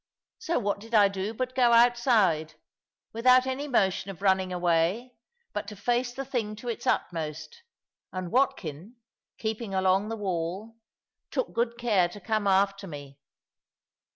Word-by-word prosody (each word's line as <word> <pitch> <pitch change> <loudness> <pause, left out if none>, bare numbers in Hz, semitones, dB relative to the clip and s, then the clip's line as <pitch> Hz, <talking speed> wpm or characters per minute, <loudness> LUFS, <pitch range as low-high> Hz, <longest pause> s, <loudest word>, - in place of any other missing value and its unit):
So 340 - -1
what 205 0 -1
did 225 +2 -5
I 205 -2 +6
do 195 +1 -3
but 255 +3 -4
go 245 -2 +4
outside, 230 - +3 0.6
without 255 +3 +5
any 265 +3 -3
motion 195 -7 +1
of 195 0 -9
running 190 -1 +2
away, 180 +7 0 0.4
but 210 -1 -4
to 210 - -7
face 245 +4 0
the 270 +2 -6
thing 230 -5 -3
to 240 +3 -7
its 230 - -5
utmost; 155 -2 -2 0.5
and 185 -2 -5
Watkin, 205 - -1 0.4
keeping 220 -2 -3
along 190 +2 +2
the 225 - -4
wall, 190 +3 -3 0.5
took - - -2
good 235 0 -1
care 210 -8 +2
to 205 - -10
come 215 +1 -1
after 195 0 +2
me. 145 -3 -10
205 Hz, 150 wpm, -27 LUFS, 185-240 Hz, 0.6 s, I